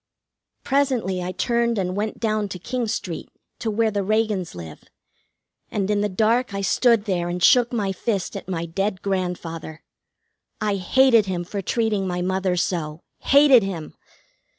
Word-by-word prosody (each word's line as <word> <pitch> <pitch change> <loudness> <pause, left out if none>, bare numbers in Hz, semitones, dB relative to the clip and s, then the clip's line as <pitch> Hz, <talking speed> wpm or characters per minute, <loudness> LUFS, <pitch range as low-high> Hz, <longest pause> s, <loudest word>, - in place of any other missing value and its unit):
Presently 255 -10 0
I 180 +1 -3
turned 235 +5 0
and 185 -1 -1
went 210 +1 -3
down 215 -2 0
to 185 - -5
King 240 +6 -3
Street, 185 -6 -4 0.3
to 225 - -2
where 220 +1 +1
the 200 -1 -1
Reagans 210 - 0
live, 80 -3 -10 0.8
and 200 -1 -1
in 205 -1 +1
the 210 - 0
dark 220 +3 +1
I 200 - -2
stood 230 +2 +3
there 175 -4 -1
and 175 0 -3
shook 245 -1 +5
my 205 -5 -1
fist 195 -1 -2
at 195 -1 -7
my 170 -2 -2
dead 190 +3 -2
grandfather. 175 -4 -4 0.8
I 210 -2 0
hated 230 +3 +4
him 180 -2 -2
for 200 +3 -5
treating 210 -1 0
my 180 -1 -2
mother 190 0 0
so. 165 -3 -2 0.2
Hated 280 -3 +6
him! 180 -6 -5
200 Hz, 160 wpm, -23 LUFS, 180-225 Hz, 0.8 s, Hated